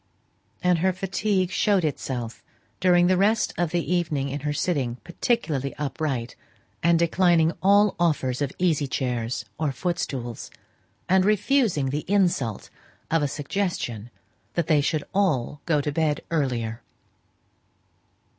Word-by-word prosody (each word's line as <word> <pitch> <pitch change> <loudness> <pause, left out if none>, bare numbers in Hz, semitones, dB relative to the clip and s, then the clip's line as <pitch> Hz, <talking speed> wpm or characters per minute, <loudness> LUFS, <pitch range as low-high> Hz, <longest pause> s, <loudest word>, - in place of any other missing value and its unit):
And 180 -2 +3
her 185 +2 +2
fatigue 190 0 0
showed 200 -3 +2
itself 125 -5 -4 0.4
during 180 -1 +4
the 185 +1 +3
rest 215 +3 +2
of 175 -2 0
the 175 +1 -1
evening 155 -6 0
in 140 +2 -3
her 145 +1 -2
sitting 140 -6 -1
particularly 165 - -1
upright, 140 -5 -3 0.5
and 170 0 +4
declining 170 -1 +3
all 200 +1 +4
offers 150 -6 +1
of 140 -2 0
easy 160 -6 +1
chairs 125 -2 -2
or 155 -3 0
foot 175 +6 -2
stools, 120 -4 -4 0.6
and 190 0 +4
refusing 210 - +2
the 150 +2 -2
insult 175 - 0 0.4
of 165 -1 +3
a 145 - +1
suggestion 140 - -3 0.5
that 170 - +1
they 155 -2 +3
should 150 +1 0
all 150 -8 0
go 150 -3 +3
to 150 - -2
bed 150 -1 0
earlier. 120 -7 -1
160 Hz, 135 wpm, -25 LUFS, 135-185 Hz, 0.6 s, during